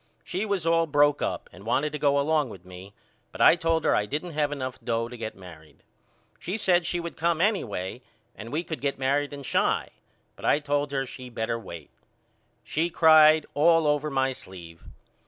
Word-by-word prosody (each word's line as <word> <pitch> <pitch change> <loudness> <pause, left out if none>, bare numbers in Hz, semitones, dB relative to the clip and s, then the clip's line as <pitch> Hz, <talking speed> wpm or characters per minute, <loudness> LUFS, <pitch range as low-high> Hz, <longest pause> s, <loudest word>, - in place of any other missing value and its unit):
She 195 +5 -3
was 195 -5 -1
all 165 0 +2
broke 145 -1 +3
up - - -3
and 90 +3 -13
wanted 140 +7 0
to 150 - -5
go 140 -1 +2
along 150 -1 +1
with 90 -4 -12
me 90 +2 -12 0.4
but - - -11
I - - +7
told 165 -2 0
her - - +3
I 105 - 0
didn't 155 +7 -4
have 150 -1 -1
enough 130 -3 -5
dough 115 0 -1
to 125 - -10
get 115 -2 -6
married. 80 -5 -15 0.6
She 185 +5 -4
said 175 -5 +2
she 175 - -1
would 170 0 -6
come 170 0 0
anyway 125 - -1 0.3
and 115 +2 -9
we 155 +4 -1
could 160 -6 -6
get 140 0 -1
married 140 +2 0
in 140 -1 -8
Chi - - 0 0.5
but - - -15
I - - +3
told 145 -1 -1
her 135 -1 -1
she 130 -1 -10
better 115 0 -3
wait. 85 -9 -10 0.7
She 165 +3 -1
cried 155 -2 +6
all 165 +2 +4
over 150 0 +1
my 135 -1 0
sleeve. 85 -7 -12
145 Hz, 195 wpm, -26 LUFS, 115-160 Hz, 0.7 s, I